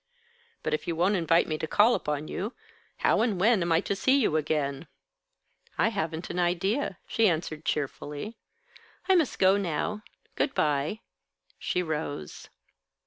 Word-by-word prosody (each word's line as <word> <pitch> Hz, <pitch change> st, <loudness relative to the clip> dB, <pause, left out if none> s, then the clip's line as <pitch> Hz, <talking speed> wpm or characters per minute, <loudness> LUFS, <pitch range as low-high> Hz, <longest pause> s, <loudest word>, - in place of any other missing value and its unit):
"But -, -, -1 dB
if 155 Hz, -, -2 dB
you 170 Hz, -, -1 dB
won't 180 Hz, +5 st, +2 dB
invite 170 Hz, -1 st, +3 dB
me 155 Hz, -1 st, -2 dB
to 160 Hz, -, -2 dB
call 215 Hz, +8 st, +5 dB
upon 150 Hz, -4 st, -2 dB
you, 210 Hz, +7 st, -4 dB, 0.5 s
how -, -, +4 dB
and 220 Hz, -6 st, +1 dB
when 215 Hz, +1 st, +4 dB
am 170 Hz, 0 st, 0 dB
I 165 Hz, +1 st, +4 dB
to 200 Hz, -, -2 dB
see 265 Hz, +7 st, +3 dB
you 215 Hz, -, +2 dB
again?" 150 Hz, -1 st, -1 dB, 0.9 s
"I -, -, +3 dB
haven't 165 Hz, -6 st, -3 dB
an 180 Hz, -, -3 dB
idea," 185 Hz, +6 st, 0 dB
she 225 Hz, -3 st, +3 dB
answered, 160 Hz, -2 st, -3 dB
cheerfully. 150 Hz, -, -3 dB, 0.7 s
"I 380 Hz, -, +5 dB
must 330 Hz, -7 st, +2 dB
go 190 Hz, +1 st, +5 dB
now. 200 Hz, +3 st, -2 dB, 0.3 s
Good 275 Hz, -, 0 dB
by." 150 Hz, +7 st, 0 dB, 0.6 s
She 180 Hz, -, -1 dB
rose. 150 Hz, -, -5 dB
175 Hz, 155 wpm, -28 LUFS, 155-210 Hz, 0.9 s, call